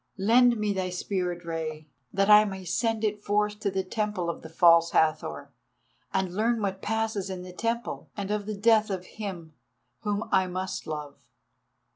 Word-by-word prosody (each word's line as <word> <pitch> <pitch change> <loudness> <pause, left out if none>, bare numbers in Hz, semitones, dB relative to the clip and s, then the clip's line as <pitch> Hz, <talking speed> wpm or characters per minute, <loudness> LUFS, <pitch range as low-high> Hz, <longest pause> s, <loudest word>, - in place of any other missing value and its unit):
Lend 235 +4 +5
me 210 -1 0
thy 185 -1 -2
Spirit, 180 -1 -3
Rei, 155 -2 -4 0.2
that 195 0 +1
I 210 0 +9
may 195 -3 -5
send 225 +5 0
it 210 -1 -1
forth 210 0 0
to 210 - 0
the 190 0 -1
Temple 200 -3 -2
of - - -11
the 160 - -10
False 170 0 +5
Hathor, 155 -1 0 0.6
and 190 -2 -1
learn 225 +4 +1
what 195 -2 -2
passes 220 -3 -1
in 185 -1 -5
the 180 0 -9
temple, 230 +3 -3
and 200 0 -3
of 210 -1 -2
the 215 -1 -3
death 220 0 +4
of 185 -2 -3
him—whom 175 - -7
I 190 0 +3
must 185 +1 -4
love." 150 -2 -6
195 Hz, 170 wpm, -27 LUFS, 175-210 Hz, 0.6 s, I